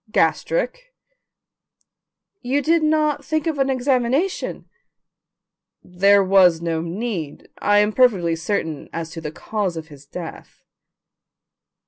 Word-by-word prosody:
"Gastric." -, -, 0 dB, 1.5 s
"You 270 Hz, +3 st, 0 dB
did 330 Hz, +2 st, +3 dB
not 305 Hz, -2 st, +1 dB
think 310 Hz, -1 st, -1 dB
of 315 Hz, -4 st, -2 dB
an 270 Hz, 0 st, +2 dB
examination?" 265 Hz, +6 st, 0 dB, 1.2 s
"There 195 Hz, +3 st, +4 dB
was 185 Hz, -3 st, +5 dB
no 165 Hz, -1 st, -2 dB
need. 170 Hz, -3 st, -5 dB
I 205 Hz, 0 st, +3 dB
am 210 Hz, +1 st, +3 dB
perfectly 195 Hz, -10 st, +3 dB
certain 160 Hz, -3 st, -3 dB
as 165 Hz, -1 st, -5 dB
to 165 Hz, -, -7 dB
the 150 Hz, -2 st, -5 dB
cause 195 Hz, 0 st, -3 dB
of 160 Hz, 0 st, -7 dB
his 145 Hz, -1 st, -15 dB
death." 170 Hz, +1 st, -9 dB
205 Hz, 115 wpm, -21 LUFS, 165-280 Hz, 1.5 s, was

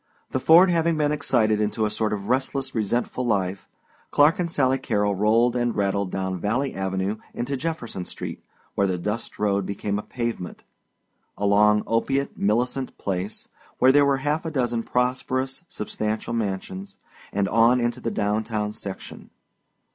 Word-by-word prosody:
The 130 Hz, -, 0 dB
Ford 170 Hz, +7 st, +7 dB
having 165 Hz, -1 st, +2 dB
been 150 Hz, -1 st, +2 dB
excited 110 Hz, -7 st, +2 dB
into 105 Hz, +1 st, 0 dB
a 105 Hz, -, -1 dB
sort 110 Hz, 0 st, 0 dB
of 100 Hz, -1 st, -3 dB
restless 135 Hz, +2 st, -1 dB
resentful 120 Hz, +3 st, -1 dB
life 95 Hz, -5 st, -1 dB, 0.4 s
Clark 150 Hz, +4 st, +4 dB
and 170 Hz, -2 st, -1 dB
Sally 135 Hz, -3 st, +2 dB
Carrol 105 Hz, -5 st, 0 dB
rolled 115 Hz, +5 st, +3 dB
and 120 Hz, -1 st, 0 dB
rattled 100 Hz, -1 st, 0 dB
down 95 Hz, -1 st, -3 dB
Valley 125 Hz, +9 st, 0 dB
Avenue 95 Hz, +2 st, -2 dB, 0.2 s
into 125 Hz, +4 st, -2 dB
Jefferson 130 Hz, -, -4 dB
Street, -, -, -7 dB, 0.3 s
where 100 Hz, -, +2 dB
the 90 Hz, -1 st, -1 dB
dust 105 Hz, +6 st, -4 dB
road 100 Hz, -1 st, +1 dB
became 100 Hz, +1 st, -2 dB
a -, -, -3 dB
pavement; 115 Hz, -6 st, -5 dB, 0.7 s
along 105 Hz, +1 st, +4 dB
opiate 135 Hz, +5 st, 0 dB
Millicent 125 Hz, +5 st, 0 dB
Place, 95 Hz, +2 st, -4 dB, 0.3 s
where 130 Hz, +1 st, +6 dB
there 145 Hz, +1 st, +5 dB
were 140 Hz, -1 st, +3 dB
half 150 Hz, +4 st, -1 dB
a 165 Hz, -, -3 dB
dozen 120 Hz, -6 st, 0 dB
prosperous, 130 Hz, +4 st, -1 dB
substantial 110 Hz, -1 st, -3 dB
mansions; 95 Hz, -3 st, -4 dB, 0.3 s
and 100 Hz, 0 st, 0 dB
on 115 Hz, +4 st, +4 dB
into 120 Hz, -1 st, -1 dB
the -, -, -1 dB
down 105 Hz, 0 st, 0 dB
town 105 Hz, -1 st, -2 dB
section. 100 Hz, -2 st, -8 dB
115 Hz, 155 wpm, -24 LUFS, 100-130 Hz, 0.7 s, Ford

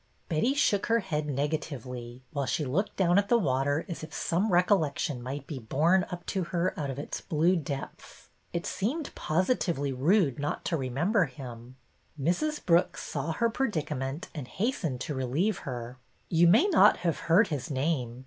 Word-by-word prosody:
Betty 190 Hz, -, +1 dB
shook 205 Hz, -8 st, +2 dB
her 230 Hz, 0 st, +3 dB
head 155 Hz, -6 st, -2 dB
negatively, 130 Hz, -4 st, -4 dB
while 140 Hz, -3 st, -1 dB
she 150 Hz, -, 0 dB
looked 165 Hz, +11 st, -1 dB
down 180 Hz, 0 st, +4 dB
at 200 Hz, 0 st, -2 dB
the 240 Hz, -, +5 dB
water 145 Hz, -, +1 dB
as 170 Hz, -4 st, -6 dB
if 155 Hz, -, -8 dB
some 190 Hz, +5 st, 0 dB
recollec 175 Hz, -4 st, +3 dB
tion 140 Hz, -8 st, -2 dB
might 135 Hz, +3 st, -5 dB
be 140 Hz, -3 st, -6 dB
borne 165 Hz, +11 st, +2 dB
up 175 Hz, -1 st, -7 dB
to 190 Hz, -3 st, -1 dB
her 175 Hz, +1 st, 0 dB
out 145 Hz, -3 st, -3 dB
of 135 Hz, -, -4 dB
its 145 Hz, -, -5 dB
blue 165 Hz, +4 st, +2 dB
depths. 140 Hz, -4 st, -6 dB, 0.2 s
It 170 Hz, 0 st, -3 dB
seemed 275 Hz, -, -2 dB
positively 165 Hz, -, 0 dB
rude 145 Hz, -, +2 dB
not 145 Hz, +1 st, -3 dB
to 170 Hz, -, 0 dB
re 130 Hz, -3 st, -3 dB
member 175 Hz, -, +2 dB
him. 125 Hz, -2 st, -10 dB, 0.4 s
Mrs. 180 Hz, -, 0 dB
Brooks 170 Hz, -1 st, +2 dB
saw 150 Hz, +3 st, -3 dB
her 235 Hz, +7 st, +2 dB
predicament 155 Hz, -, -2 dB
and 145 Hz, -6 st, -6 dB
hastened 185 Hz, -, -2 dB
to 155 Hz, -, -3 dB
relieve 145 Hz, -, 0 dB
her. 125 Hz, 0 st, -6 dB
'' -, -, -39 dB
You 170 Hz, 0 st, +5 dB
may 185 Hz, -, +6 dB
not 390 Hz, -6 st, +6 dB
have 165 Hz, -, +1 dB
heard 195 Hz, +6 st, +5 dB
his 145 Hz, -5 st, -3 dB
name. 130 Hz, -4 st, -1 dB
155 Hz, 180 wpm, -29 LUFS, 135-185 Hz, 0.4 s, may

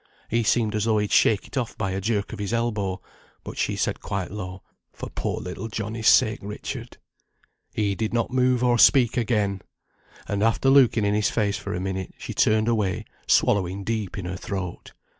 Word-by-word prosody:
He 115 Hz, +1 st, +1 dB
seem'd 110 Hz, 0 st, +1 dB
as 105 Hz, 0 st, 0 dB
though 110 Hz, -1 st, +2 dB
he'd 105 Hz, -1 st, -1 dB
shake 105 Hz, -3 st, +4 dB
it -, -, -12 dB
off 120 Hz, -3 st, -2 dB
by 95 Hz, -, -1 dB
a 95 Hz, +1 st, -2 dB
jerk 105 Hz, 0 st, -1 dB
on -, -, -7 dB
his 105 Hz, +2 st, -3 dB
elbow, 105 Hz, -5 st, -1 dB, 0.4 s
but -, -, -7 dB
she -, -, 0 dB
said -, -, -1 dB
quite 95 Hz, -3 st, -3 dB
low, 95 Hz, -2 st, -7 dB, 0.3 s
'For -, -, -8 dB
poor -, -, -3 dB
little 90 Hz, +5 st, -6 dB
Johnnie's 110 Hz, +1 st, -3 dB
sake, 110 Hz, -, +5 dB
Richard.' 105 Hz, +1 st, -7 dB, 0.8 s
He 105 Hz, -2 st, +1 dB
did 110 Hz, +2 st, -2 dB
not 120 Hz, +1 st, 0 dB
move 125 Hz, -1 st, +2 dB
or 120 Hz, -1 st, +3 dB
speak 120 Hz, -2 st, +6 dB
again, 105 Hz, -5 st, 0 dB, 0.7 s
and 100 Hz, 0 st, -1 dB
after 115 Hz, +4 st, +3 dB
looking 125 Hz, -6 st, +5 dB
in 100 Hz, -, +2 dB
his 105 Hz, -1 st, +2 dB
face 105 Hz, -3 st, 0 dB
for -, -, -4 dB
a -, -, -2 dB
minute, 95 Hz, 0 st, -4 dB
she -, -, -6 dB
turned 110 Hz, 0 st, +3 dB
away, 110 Hz, -2 st, 0 dB, 0.2 s
swallowing 95 Hz, 0 st, +2 dB
deep 110 Hz, -2 st, -3 dB
in 95 Hz, -, -4 dB
her 90 Hz, +1 st, -4 dB
throat. 95 Hz, -2 st, -6 dB
105 Hz, 195 wpm, -24 LUFS, 100-115 Hz, 0.8 s, speak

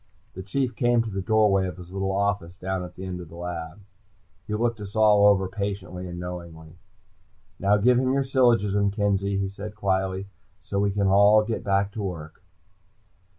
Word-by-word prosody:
The 95 Hz, -, -7 dB
Chief 125 Hz, +6 st, -2 dB
came 120 Hz, -2 st, +2 dB
to 110 Hz, -, -6 dB
the 95 Hz, 0 st, -3 dB
doorway 100 Hz, -2 st, +3 dB
of 90 Hz, -, -7 dB
his 90 Hz, -1 st, -11 dB
little 95 Hz, 0 st, -2 dB
office 100 Hz, -3 st, -1 dB
down 95 Hz, 0 st, -3 dB
at 90 Hz, 0 st, -10 dB
the 95 Hz, -, -7 dB
end 90 Hz, -1 st, -5 dB
of 85 Hz, -, -11 dB
the 85 Hz, -, -12 dB
lab. 85 Hz, +1 st, -6 dB, 0.7 s
He 105 Hz, -, -2 dB
looked 115 Hz, 0 st, -1 dB
us 100 Hz, +1 st, -8 dB
all 105 Hz, -2 st, +5 dB
over 95 Hz, -2 st, +3 dB
patiently 95 Hz, -2 st, -5 dB
and 85 Hz, 0 st, -7 dB
knowingly. 85 Hz, -3 st, -8 dB, 0.9 s
"Now 100 Hz, +2 st, +3 dB
give 125 Hz, +4 st, +4 dB
him 130 Hz, 0 st, +1 dB
your 135 Hz, +1 st, +1 dB
syllogism, 115 Hz, -7 st, +2 dB
Kenzie," 100 Hz, -1 st, 0 dB
he 100 Hz, 0 st, -1 dB
said 100 Hz, +2 st, -8 dB
quietly, 95 Hz, -1 st, -1 dB, 0.3 s
"so 100 Hz, +1 st, -3 dB
we 100 Hz, 0 st, +2 dB
can 100 Hz, 0 st, 0 dB
all 100 Hz, +2 st, +5 dB
get 110 Hz, +1 st, -3 dB
back 100 Hz, 0 st, +1 dB
to 110 Hz, -, -6 dB
work." 80 Hz, -5 st, -6 dB
100 Hz, 190 wpm, -25 LUFS, 95-105 Hz, 0.9 s, all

